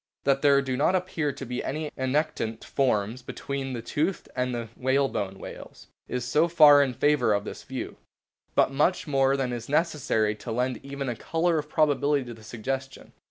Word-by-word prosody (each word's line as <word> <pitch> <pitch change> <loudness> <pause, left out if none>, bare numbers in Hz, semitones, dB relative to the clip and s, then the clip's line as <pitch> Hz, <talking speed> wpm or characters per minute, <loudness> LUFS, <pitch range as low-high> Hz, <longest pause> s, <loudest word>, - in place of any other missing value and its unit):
That 135 0 +2
there 140 -1 +5
do 130 -1 -2
not 150 +8 +2
appear 175 -5 -1
to 135 - -8
be 125 0 -4
any 150 +2 -3
annectant 130 -4 -1
forms 120 -3 0
between 135 +1 -5
the 115 -2 -5
toothed 160 +9 -1
and 125 0 0
the 120 -2 -4
whalebone 130 -7 0
whales - - -10 0.2
is 125 -1 -3
so 150 +7 +3
far 150 -4 +7
in 130 -3 0
favour 145 -6 +3
of 100 0 0
this - - -7
view. - - -6 0.6
But - - +4
much 150 +7 +1
more 135 -2 +2
than 130 -2 -1
that 120 - -2
is 115 +2 -10
necessary 145 -9 +1
to 115 - -7
lend 125 0 -1
even 140 0 -5
a 120 - -2
colour 165 +5 0
of 150 0 -7
probability 145 -2 +2
to 120 - -7
the 110 - -14
suggestion. 130 +5 -5
135 Hz, 190 wpm, -27 LUFS, 125-150 Hz, 0.6 s, far